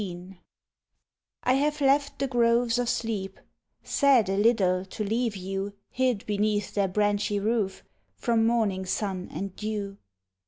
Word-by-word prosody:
XIX 180 Hz, 0 st, -8 dB, 1.1 s
I 255 Hz, -, +3 dB
have 295 Hz, +3 st, +1 dB
left 280 Hz, 0 st, +2 dB
the 275 Hz, -, 0 dB
groves 240 Hz, -1 st, +2 dB
of 245 Hz, -1 st, 0 dB
sleep, 205 Hz, -6 st, -3 dB, 0.4 s
Sad 265 Hz, -8 st, +3 dB
a 195 Hz, -, +1 dB
little 195 Hz, -4 st, +3 dB
to 190 Hz, +3 st, -5 dB
leave 225 Hz, +1 st, -1 dB
you 195 Hz, +1 st, -4 dB, 0.2 s
Hid 250 Hz, -5 st, 0 dB
beneath 210 Hz, -1 st, 0 dB
their 200 Hz, -1 st, +1 dB
branchy 205 Hz, +1 st, 0 dB
roof 210 Hz, -2 st, -1 dB, 0.3 s
From 230 Hz, -2 st, +1 dB
morning 205 Hz, -5 st, 0 dB
sun 190 Hz, -2 st, -2 dB
and 195 Hz, -1 st, -5 dB
dew. 210 Hz, -2 st, -4 dB
210 Hz, 135 wpm, -27 LUFS, 195-235 Hz, 1.1 s, I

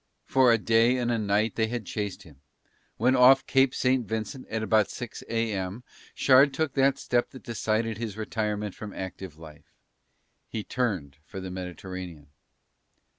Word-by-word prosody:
For 130 Hz, -2 st, +4 dB
a 115 Hz, -, +5 dB
day 115 Hz, +3 st, +3 dB
and 120 Hz, -1 st, 0 dB
a 115 Hz, -, 0 dB
night 105 Hz, +1 st, +1 dB
they 110 Hz, -1 st, 0 dB
had 120 Hz, -2 st, -4 dB
chased 105 Hz, -1 st, -4 dB
him, 70 Hz, -5 st, -18 dB, 0.6 s
when 125 Hz, +4 st, +3 dB
off 130 Hz, +2 st, +6 dB
Cape 135 Hz, -1 st, +3 dB
St. 130 Hz, -1 st, +2 dB
Vincent 110 Hz, +4 st, -4 dB
at 110 Hz, 0 st, -3 dB
about 110 Hz, -2 st, +3 dB
six 125 Hz, -2 st, -7 dB
a.m. 110 Hz, -2 st, -2 dB, 0.3 s
Shard 135 Hz, +1 st, +5 dB
took 160 Hz, -1 st, -1 dB
that 135 Hz, 0 st, +3 dB
step 120 Hz, 0 st, 0 dB
that 130 Hz, -, -13 dB
decided 110 Hz, -2 st, -1 dB
his 110 Hz, -3 st, -5 dB
retirement 105 Hz, -2 st, -2 dB
from 105 Hz, -2 st, -8 dB
active 95 Hz, -3 st, -7 dB
life, 80 Hz, -2 st, -14 dB, 0.7 s
he 110 Hz, -, -4 dB
turned 95 Hz, -, -2 dB
for 95 Hz, +5 st, -8 dB
the 95 Hz, -1 st, -6 dB
Mediterranean. 90 Hz, -4 st, -7 dB
110 Hz, 160 wpm, -27 LUFS, 95-125 Hz, 0.7 s, off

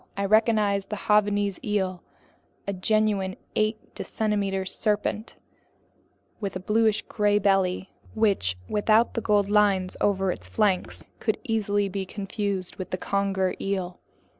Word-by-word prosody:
I 200 Hz, -, 0 dB
recognized 210 Hz, -2 st, +2 dB
the 210 Hz, -, -4 dB
Javanese 205 Hz, -2 st, +2 dB
eel, 190 Hz, -4 st, -1 dB, 0.7 s
a 200 Hz, -, -1 dB
genuine 200 Hz, -1 st, +1 dB, 0.2 s
eight 215 Hz, 0 st, +1 dB, 0.2 s
decimeter 200 Hz, -3 st, -1 dB
serpent 210 Hz, +2 st, -1 dB, 1.0 s
with 200 Hz, -3 st, -4 dB
a -, -, -2 dB
bluish 215 Hz, +2 st, +2 dB
gray 205 Hz, -1 st, +1 dB
belly, 195 Hz, -2 st, +1 dB, 0.2 s
which, 195 Hz, -, +1 dB
without 215 Hz, +2 st, +3 dB
the 230 Hz, -, -2 dB
gold 205 Hz, -2 st, +2 dB
lines 200 Hz, -3 st, +2 dB
over 195 Hz, -2 st, +2 dB
its -, -, -8 dB
flanks, 200 Hz, -4 st, 0 dB
could 220 Hz, -, 0 dB
easily 205 Hz, -3 st, 0 dB
be 195 Hz, 0 st, -4 dB
confused 200 Hz, -2 st, -3 dB
with 185 Hz, -, -6 dB
the 185 Hz, -, -2 dB
conger 195 Hz, -1 st, 0 dB
eel. 185 Hz, -2 st, -3 dB
200 Hz, 130 wpm, -26 LUFS, 190-210 Hz, 1.0 s, without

